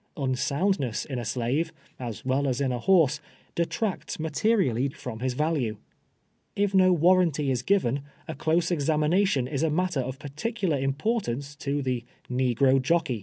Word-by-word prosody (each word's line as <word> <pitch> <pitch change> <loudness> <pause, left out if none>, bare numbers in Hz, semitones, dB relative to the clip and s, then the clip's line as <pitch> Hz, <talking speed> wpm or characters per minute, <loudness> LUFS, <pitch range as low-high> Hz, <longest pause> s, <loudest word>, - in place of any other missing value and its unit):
Un 135 -3 0
soundness 140 - 0
in 130 -4 -4
a - - -4
slave, 120 +8 -1 0.3
as 120 -3 -6
well 135 +2 +1
as 130 -1 0
in 135 -2 +1
a 125 - -2
hoi 180 +4 +5
se, 145 +2 -4 0.3
detracts 180 +3 -2
materially 155 - +1
from 125 -4 -7
his 125 0 -2
value. 145 -8 0 0.8
If 200 -1 +1
no 185 -1 +5
warranty 170 -4 +3
is 125 -2 0
given, 145 -6 +1 0.3
a - - -4
close 160 +5 +1
examination 155 -1 +2
is 140 -1 -2
a 160 - +2
matter 180 0 0
of 130 +1 -5
particular 155 - -2
impor 155 - 0
tance 140 +1 -5
to 145 -1 -2
the 125 -2 -1 0.3
negro 130 +1 +3
jockey. 150 -4 +1
145 Hz, 165 wpm, -27 LUFS, 130-170 Hz, 0.8 s, hoi